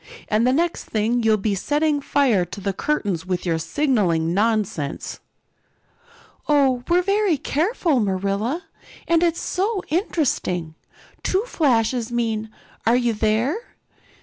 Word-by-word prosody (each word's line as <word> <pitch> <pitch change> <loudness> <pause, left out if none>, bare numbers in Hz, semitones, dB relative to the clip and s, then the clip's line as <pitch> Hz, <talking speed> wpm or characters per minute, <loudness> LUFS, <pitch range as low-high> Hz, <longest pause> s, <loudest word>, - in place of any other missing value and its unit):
"And 220 +3 +2
the - - +4
next 335 +5 0
thing 225 +3 0
you'll 220 -1 +3
be 210 0 -1
setting 295 +8 0
fire 265 -10 +2
to 175 +3 -8
the 200 0 -2
curtains 200 - -1
with 180 -1 -2
your 165 -2 0
signaling 175 - +1
nonsense." 205 -8 -1 1.3
"Oh, 270 -4 +3
we're 355 +1 +4
very 395 -3 +2
careful, 315 - 0
Marilla. 200 - -1 0.4
And 335 0 +3
it's 340 -1 +1
so 390 +1 -1
interesting. 270 - -1 0.5
Two 380 +3 +1
flashes 245 - +1
mean, 225 -2 -1 0.4
'Are 230 - +5
you 240 -2 +2
there? 225 - -1
240 Hz, 125 wpm, -22 LUFS, 205-310 Hz, 1.3 s, Are